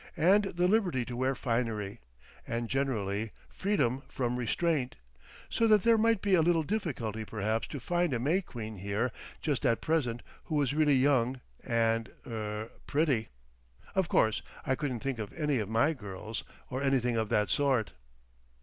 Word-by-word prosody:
And 190 +6 +5
the 180 -2 +1
liberty 180 - +2
to 120 - -5
wear 130 +2 +1
finery. 115 -5 -2 0.5
And 115 0 -2
generally—freedom 130 - -1
from 125 -2 -1
restraint. 130 +2 0 0.5
So 230 - +2
that 215 -3 +5
there 230 0 +6
might 225 -2 +3
be 200 -2 +2
a 175 - +6
little 165 0 +3
difficulty 130 - -2
perhaps 110 +1 -1
to 145 - -6
find 175 +5 0
a 125 - +1
May 155 +11 +2
Queen 110 - -7
here 100 +6 -1 0.3
just 150 -4 0
at 115 -4 +3
present 130 -8 0 0.2
who 155 - -3
was 145 -2 +2
really 150 -2 +4
young 130 -1 +3 0.2
and 115 -2 +1 0.2
er—pretty.... 110 +4 -2 0.6
Of 190 -3 +1
course 110 -1 +3 0.2
I 130 - +2
couldn't 130 -4 -2
think 135 -4 -2
of 105 -2 -5
any 150 -5 0
of 105 -2 -3
my 115 +8 +3
girls—or 110 +3 -7
anything 130 -3 +2
of 110 -2 0
that 105 -4 +2
sort." 135 -7 +2
130 Hz, 155 wpm, -31 LUFS, 115-155 Hz, 0.6 s, there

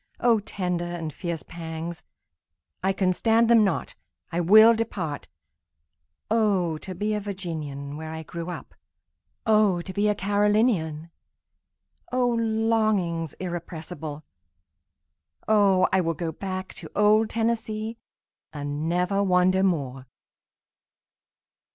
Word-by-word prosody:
O 235 -2 +4
tender 180 -4 -3
and 160 -3 -5
fierce 170 -3 -4
pangs—I 160 - -7
can 190 -1 +1
stand 225 +5 +3
them 230 -2 +7
not—I 175 -2 -4
will 215 +6 +8
depart;O 165 - -3
to 185 +2 -7
be 210 +3 -1
a 210 - 0
Virginian, 155 -8 -5
where 160 0 -6
I 160 0 -6
grew 170 +2 -6
up! 175 - -8 0.7
O 215 -5 +4
to 190 +2 -7
be 205 +1 +1
a 210 - +2
Carolinian!O 205 +3 -2
longings 220 - +1
irrepressible! 165 -3 -6 1.2
O 200 -4 +4
I 190 - +4
will 165 -1 -1
go 165 +1 -3
back 185 +2 -5
to - - -8
old 215 +1 +4
Tennessee, 225 0 -2 0.5
and 145 +1 -3
never 180 +3 +1
wander 185 0 +3
more! 135 -8 -1
185 Hz, 105 wpm, -25 LUFS, 160-215 Hz, 1.2 s, will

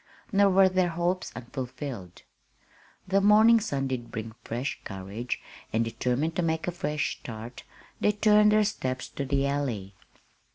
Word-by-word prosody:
Nor 200 -1 +5
were 190 0 +6
their 185 -1 +2
hopes 175 +2 -1
unfulfilled. 125 - -6 0.8
The 195 +1 +3
morning 215 +3 +7
sun 140 -11 -2
did 120 -3 -4
bring 110 0 -5
fresh 120 +5 -3
courage; 100 +5 -5 0.3
and, 115 +1 +1
determined 125 +7 -1
to - - +2
make 160 0 -1
a - - +1
fresh 150 -3 -2
start, 115 +1 -8 0.4
they 210 - +3
turned 210 0 +5
their 215 0 +5
steps 130 -11 -2
to 140 - -4
the 135 +1 +1
Alley. 125 -9 -2
140 Hz, 150 wpm, -28 LUFS, 120-190 Hz, 0.8 s, morning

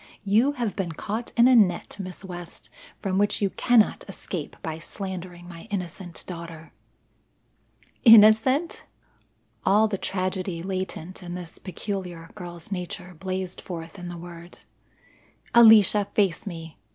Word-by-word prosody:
You 220 +8 +3
have 240 -7 -2
been 180 -5 -3
caught 215 +8 -4
in 235 +1 +7
a 255 - +6
net, 185 -7 +3
Miss 185 0 -7
West, 175 -2 -8 0.3
from 190 -1 0
which 205 0 +1
you 200 -2 0
cannot 240 -4 +3
escape 180 -4 -6
by 160 -1 -4
slandering 180 -1 -7
my 170 +2 -11
innocent 180 -3 -5
daughter." 165 -2 -8 1.3
"Innocent!" 225 +7 +6 0.8
All 210 +3 +4
the 200 -3 -3
tragedy 185 -2 -2
latent 185 -1 -5
in 175 -1 -6
this 175 -2 -8
peculiar 180 -3 -6
girl's 175 -2 -8
nature 180 0 -5
blazed 185 +1 -4
forth 170 +2 -8
in 175 0 -6
the 175 - -7
word. 170 0 -10 1.0
"Alicia, 215 -3 +7
face 200 -2 +1
me. 165 - -8
185 Hz, 130 wpm, -25 LUFS, 175-205 Hz, 1.3 s, in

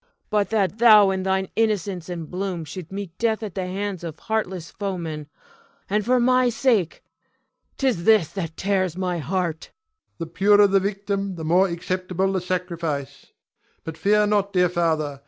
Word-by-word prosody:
Cleon. - - -41 0.2
But 210 -1 +1
that 205 -3 0
thou 215 -4 +7
in 190 0 -2
thine 190 0 0
innocence 200 -6 -1
and 170 -3 -5
bloom 180 -2 -4
should 170 +3 -8
meet 195 -3 -6
death 225 -1 0
at 205 -4 -5
the 185 0 -3
hands 195 -1 -4
of 165 -2 -6
heartless 190 -6 -3
foemen; 170 -7 -5 0.6
and 210 +2 0
for 250 +4 +2
my 255 +1 +3
sake! 225 -7 0 0.7
'Tis 255 -11 0
this 215 -6 +4
that 165 -5 -5
tears 185 -3 0
my 180 -2 -2
heart. 165 +1 -2
Ion. - - -33 0.4
The 165 - -4
purer 205 +5 +4
the 195 0 +3
victim 200 0 -3
the 160 -2 -6
more 180 +4 +4
acceptable 185 +2 -2
the 190 - -1
sacrifice. 170 -6 -4 0.6
But 160 - -6
fear 210 +5 +3
not, 205 -1 0
dear 180 -1 +3
father. 160 -5 -1
190 Hz, 170 wpm, -23 LUFS, 170-205 Hz, 0.7 s, thou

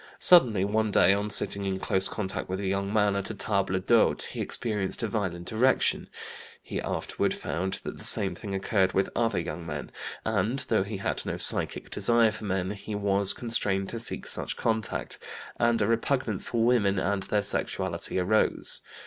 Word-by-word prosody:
Suddenly 115 - +8
one 110 +1 0
day, 95 -2 +5
on 100 +1 -1
sitting 100 0 +3
in 95 -1 -2
close 95 0 0
contact 95 -4 -4
with 95 +1 -3
a 100 - -4
young 100 +1 -1
man 105 -2 +2
at 100 -1 -3
a 110 - -5
table 100 -2 -1
d'hôte, 110 +4 +3
he - - -6
experienced 105 -1 -3
a - - +1
violent 95 -4 -3
erection; 125 +4 +2 0.5
he - - -4
afterward - - -2
found 95 +3 -3
that - - -7
the - - -10
same - - +1
thing 100 - -6
occurred 95 -1 +1
with 95 - 0
other 115 -4 +1
young 85 - -5
men, 75 -3 -6 0.3
and, 110 +5 0
though 110 -3 +3
he 100 +1 -4
had 95 - -2
no - - -4
psychic - - -1
desire 115 -2 +3
for 110 0 -6
men, 95 -1 -1
he 105 +1 -6
was 100 -1 +1
constrained 100 -5 -1
to 115 - -5
seek 115 - -3
such - - -3
contact, 110 -2 -2 0.4
and 115 -2 +2
a - - +1
repugnance 115 -2 0
for 115 -1 +1
women 105 -5 +2
and 95 +1 0
their 105 +1 0
sexuality 100 - -1
arose. 95 +4 +2
100 Hz, 185 wpm, -27 LUFS, 95-110 Hz, 0.5 s, Suddenly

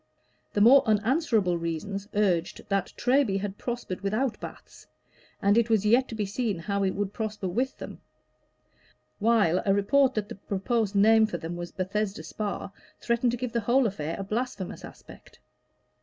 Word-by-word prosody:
The 205 - +1
more 260 +6 +8
unanswerable 215 - +2
reasoners 190 +5 -4
urged 185 -5 0
that 195 -2 0
Treby 250 -6 +2
had 200 0 -5
prospered 240 -7 -4
without 215 +5 -1
baths, - - -11 0.6
and 205 +3 +5
it 235 0 0
was 215 -2 +2
yet 245 +5 +4
to 225 - -7
be 210 -2 -1
seen 205 0 -2
how 200 +4 -2
it 190 -1 0
would 205 0 -2
prosper 215 -3 -4
with 250 +9 -2
them; - - -9 1.2
while 210 -6 +3
a 195 -1 +2
report 265 +6 +3
that 210 -2 -1
the - - -7
proposed 200 +2 -2
name 220 +2 +5
for 180 - -4
them 165 +1 -6
was 175 0 -6
Bethesda 195 +2 -2
Spa, 205 -2 -4 0.3
threatened 235 +1 +1
to - - -2
give 250 0 -4
the 235 - -1
whole 245 +5 +3
affair 165 -6 -3
a 195 - -4
blasphemous 215 -1 -4
aspect. - - -14
210 Hz, 170 wpm, -27 LUFS, 195-235 Hz, 1.2 s, more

